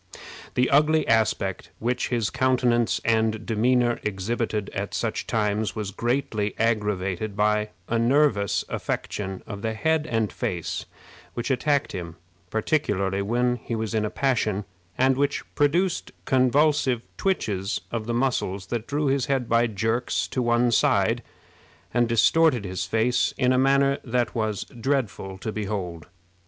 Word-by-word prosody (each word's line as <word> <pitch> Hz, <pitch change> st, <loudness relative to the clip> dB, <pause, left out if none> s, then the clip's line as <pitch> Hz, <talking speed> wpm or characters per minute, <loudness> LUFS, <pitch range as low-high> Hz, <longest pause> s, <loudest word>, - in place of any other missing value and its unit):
The 125 Hz, +1 st, +3 dB
ugly 155 Hz, +2 st, +4 dB
aspect 110 Hz, -4 st, +1 dB
which 125 Hz, +2 st, -1 dB
his 115 Hz, -4 st, 0 dB
countenance 125 Hz, -3 st, +2 dB
and 110 Hz, -1 st, +1 dB
demeanor 120 Hz, +2 st, +2 dB
exhibited 105 Hz, +1 st, -2 dB
at -, -, -4 dB
such -, -, -2 dB
times 105 Hz, -1 st, 0 dB
was 105 Hz, -3 st, -3 dB
greatly 115 Hz, -2 st, -1 dB
aggravated 105 Hz, -3 st, -1 dB
by 105 Hz, 0 st, +2 dB, 0.2 s
a 115 Hz, -, 0 dB
nervous 120 Hz, -4 st, +2 dB
affection 95 Hz, -2 st, -4 dB
of 100 Hz, -3 st, -7 dB
the 110 Hz, 0 st, -2 dB
head 160 Hz, +5 st, +1 dB
and 115 Hz, -3 st, 0 dB
face 85 Hz, -3 st, -3 dB, 0.5 s
which 120 Hz, +3 st, -2 dB
attacked 145 Hz, +2 st, +1 dB
him, 85 Hz, -4 st, -6 dB, 0.3 s
particularly 100 Hz, -, 0 dB
when 120 Hz, +4 st, +1 dB
he 120 Hz, -, -5 dB
was 110 Hz, 0 st, -3 dB
in 110 Hz, -1 st, +1 dB
a 105 Hz, -, -1 dB
passion, 110 Hz, -7 st, 0 dB, 0.3 s
and 130 Hz, 0 st, +3 dB
which 140 Hz, 0 st, 0 dB
produced 170 Hz, +5 st, +1 dB
convulsive 130 Hz, -1 st, +3 dB
twitches 105 Hz, -, -1 dB
of 115 Hz, -2 st, -3 dB
the 120 Hz, -, -1 dB
muscles 120 Hz, -7 st, -1 dB
that 115 Hz, -1 st, -2 dB
drew 145 Hz, +1 st, -1 dB
his 135 Hz, -1 st, +1 dB
head 135 Hz, -4 st, 0 dB
by 115 Hz, +1 st, +3 dB
jerks 110 Hz, +3 st, -1 dB
to 130 Hz, -, -1 dB
one 120 Hz, 0 st, +2 dB
side, -, -, +3 dB, 0.7 s
and 120 Hz, -1 st, +2 dB
distorted 125 Hz, +1 st, +4 dB
his 90 Hz, -1 st, -3 dB
face 115 Hz, +5 st, +1 dB
in 130 Hz, -1 st, +3 dB
a -, -, +2 dB
manner 140 Hz, +1 st, +3 dB
that 120 Hz, 0 st, 0 dB
was 110 Hz, -3 st, -1 dB
dreadful 115 Hz, -6 st, -2 dB
to 110 Hz, +3 st, -4 dB
behold. 95 Hz, -6 st, -4 dB
115 Hz, 145 wpm, -25 LUFS, 105-130 Hz, 0.7 s, ugly